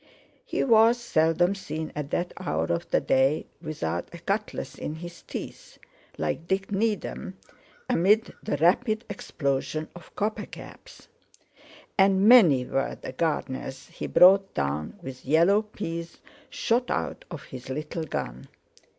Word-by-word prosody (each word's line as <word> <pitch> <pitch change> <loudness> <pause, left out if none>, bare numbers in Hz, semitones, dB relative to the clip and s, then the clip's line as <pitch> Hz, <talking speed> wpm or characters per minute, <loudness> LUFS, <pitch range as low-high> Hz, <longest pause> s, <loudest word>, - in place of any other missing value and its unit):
He - - -1
was 230 -1 +5
seldom 175 -4 +2
seen 160 -5 -5
at 150 -2 -4
that 175 +3 -2
hour 80 +1 -1
of 85 - -3
the - - +3
day 135 +3 +2 0.2
without 85 - -3
a 170 - -9
cutlass 200 +5 -3
in 150 - -5
his 170 +1 -9
teeth - - -8 0.4
(like 80 - -2
Dick 190 +2 -1
Needham) 205 -2 -2 0.5
amid 205 +6 +3
the - - -2
rapid 215 - +2
explosion 155 -3 -2
of 175 -2 -14
copper 215 +1 -2
caps. - - -12 0.9
And 195 +1 +5
many 175 - +7
were 135 - -2
the - - -6
gardeners 135 -3 -3
he - - -6
brought 195 +2 +6
down 70 +2 -2
with 130 -1 -8
yellow 170 +9 +4
peas 170 -6 -6 0.3
shot 240 +2 0
out - - -2
of 165 -5 -7
his 130 0 -10
little 150 +4 -4
gun. 60 - -5
170 Hz, 135 wpm, -26 LUFS, 135-200 Hz, 0.9 s, many